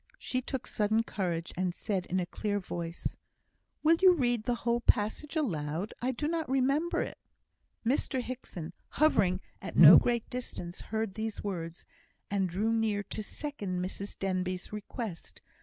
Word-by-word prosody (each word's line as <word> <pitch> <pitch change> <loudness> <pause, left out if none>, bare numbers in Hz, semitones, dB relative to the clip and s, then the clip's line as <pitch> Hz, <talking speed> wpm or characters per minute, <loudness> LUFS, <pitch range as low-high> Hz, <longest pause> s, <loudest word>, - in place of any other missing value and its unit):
She 255 - -2
took 265 0 -4
sudden 215 +1 +1
courage, 175 -6 -2
and 180 -1 -1
said, 190 -4 -2
in 185 - 0
a 180 - 0
clear 205 +3 -2
voice, 170 -2 -4 0.7
"Will 325 +2 +6
you 375 -1 +8
read 240 -6 +1
the 245 - +1
whole 235 0 +2
passage 235 +8 +1
aloud? 175 - -1
I 255 +2 +1
do 295 +4 -2
not 325 -2 -1
remember 275 +5 +2
it." - - -8 0.7
Mr 260 +2 +1
Hickson, 240 -10 -6 0.2
hovering 195 -12 +4 0.2
at - - -6
no 165 +1 +12
great 235 -2 0
distance, 180 -8 -6
heard 220 -2 -2
these 220 0 -4
words, 170 -4 -4 0.5
and 195 -2 +1
drew 210 +6 0
near 220 -3 +1
to - - -3
second 205 -6 -4
Mrs 195 +2 -5
Denbigh's 185 0 -2
request. 210 -3 -6
210 Hz, 155 wpm, -31 LUFS, 185-250 Hz, 0.7 s, no